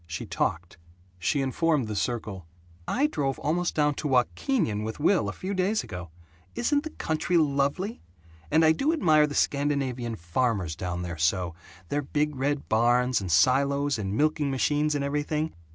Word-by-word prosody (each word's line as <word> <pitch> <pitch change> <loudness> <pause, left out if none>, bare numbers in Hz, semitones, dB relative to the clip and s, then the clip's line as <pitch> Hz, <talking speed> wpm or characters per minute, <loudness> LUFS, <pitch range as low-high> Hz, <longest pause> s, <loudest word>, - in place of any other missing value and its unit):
She 85 0 -5
talked. 85 0 -2 0.4
She 135 - 0
informed 145 -1 +1
the 105 - -4
circle 105 -5 -3 0.4
"I 280 - +1
drove 140 - -1
almost 170 +3 -1
down 150 -1 +2
to 150 - -2
Wahkeenyan 125 - +1
with 110 +4 -5
Will, 185 +6 +2
a - - -2
few 190 +2 -5
days 195 +3 +1
ago. 90 -3 -7 0.5
Isn't 285 +4 +1
the 315 - -6
country 165 - -1
lovely! 150 +7 0 0.5
And 160 0 +4
I 160 - +6
do 275 - +1
admire 155 - +4
the 145 - -6
Scandinavian 135 -5 0
farmers 90 -1 -1
down 90 +1 -4
there 85 -2 -6
so: 85 +1 +1 0.4
their 145 - 0
big 150 +1 -1
red 140 +2 -1
barns 120 +1 +2
and 95 -3 -4
silos 140 - +3
and 100 0 -2
milking 155 -1 +1
machines 145 +3 +1
and 145 - -1
everything. 150 +2 -1
140 Hz, 165 wpm, -27 LUFS, 110-155 Hz, 0.5 s, I